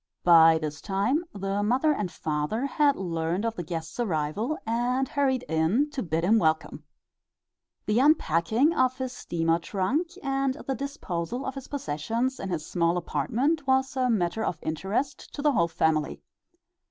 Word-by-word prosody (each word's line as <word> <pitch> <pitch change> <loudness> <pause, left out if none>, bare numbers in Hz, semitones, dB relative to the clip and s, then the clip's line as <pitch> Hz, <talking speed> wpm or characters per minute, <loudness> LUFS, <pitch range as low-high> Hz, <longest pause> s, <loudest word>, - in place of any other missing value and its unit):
By 165 -2 +7
this 155 -1 -5
time 220 - 0
the 195 0 -2
mother 255 +9 +2
and 205 -10 -3
father 155 - -2
had 285 0 +2
learned 170 +2 -2
of 225 -1 -1
the - - -4
guest's 165 +2 -6
arrival 205 - -1
and 245 +3 0
hurried 265 -3 0
in 165 - +1
to 275 - -3
bid 165 -2 -1
him 220 +5 +4
welcome. 160 -2 0 1.0
The 210 +3 +2
unpacking 255 - +3
of 255 -4 +1
his 260 -1 -4
steamer 165 -7 0
trunk 205 - -1 0.2
and 270 -1 0
the 270 - -1
disposal 245 - -4
of 265 - -3
his 270 -2 -8
possessions 235 - -2
in 195 - -4
his 165 -4 -3
small 170 0 +1
apartment 245 - -1
was 265 0 +2
a 255 -1 +1
matter 210 -1 0
of 170 - -2
interest 195 - -3
to 285 - -5
the 300 - +4
whole 170 -10 +2
family. 160 -2 0
210 Hz, 160 wpm, -27 LUFS, 165-265 Hz, 1.0 s, By